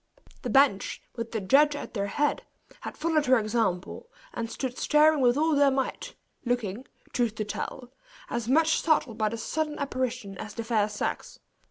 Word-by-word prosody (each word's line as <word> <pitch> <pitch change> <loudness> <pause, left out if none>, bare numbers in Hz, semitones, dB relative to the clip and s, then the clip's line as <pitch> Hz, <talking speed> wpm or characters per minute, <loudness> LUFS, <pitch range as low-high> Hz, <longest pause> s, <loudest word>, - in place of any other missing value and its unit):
The 250 - -4
bench, 250 -5 +3 0.2
with 230 -1 -5
the 225 - -1
judge 285 +9 +4
at - - -7
their 200 -3 -1
head, 295 +7 0 0.4
had - - -8
followed 310 -2 +1
her 255 0 +6
example, 215 - -1 0.2
and 230 -1 -4
stood 250 +1 -4
staring 305 -1 +4
with 245 0 +4
all 315 +1 +2
their 285 0 +5
might, 270 0 -3 0.3
looking, 240 -1 -2 0.3
truth 235 -3 0
to 215 - -3
tell, 245 +5 -6 0.3
as 235 -2 -3
much 315 +5 +3
startled 265 -8 +1
by 215 -1 +2
the 230 - -5
sudden 305 +6 -2
apparition 255 -7 -3
as 215 -1 -7
the 230 - -3
fair 220 -2 +1
sex. 210 - -4
245 Hz, 175 wpm, -27 LUFS, 220-290 Hz, 0.4 s, her